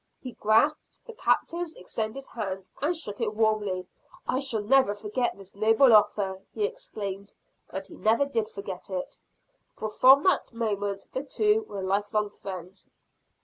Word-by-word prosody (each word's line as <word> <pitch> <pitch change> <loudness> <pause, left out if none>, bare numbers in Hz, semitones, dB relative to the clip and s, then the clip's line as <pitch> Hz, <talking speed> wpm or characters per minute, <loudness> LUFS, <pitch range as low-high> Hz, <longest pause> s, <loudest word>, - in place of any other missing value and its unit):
He 255 - -7
grasped 230 +8 +1
the 465 - -9
Captain's 345 -5 0
extended 220 +8 -4
hand, 195 -4 -5
and 325 +4 +1
shook 210 -9 -4
it 215 -2 -1
warmly. 210 -4 +1 0.4
"I 255 - +1
shall 240 -6 0
never 260 -2 +4
forget 215 +4 -2
this 195 -1 -12
noble 225 +4 +5
offer," 195 -2 +3
he 420 - +1
exclaimed. 210 - -6 0.3
And 190 0 -5
he 190 - -11
never 225 +8 +2
did 225 -6 -1
forget 200 -3 -7
it; 185 -2 -5 0.6
for 215 0 -4
from 265 +6 +7
that 370 -8 +2
moment 205 -3 -2
the 260 - -2
two 425 +8 +2
were 195 -2 -5
life 200 +2 0
long 210 -1 +1
friends. 185 -1 -8
215 Hz, 155 wpm, -27 LUFS, 200-270 Hz, 0.6 s, from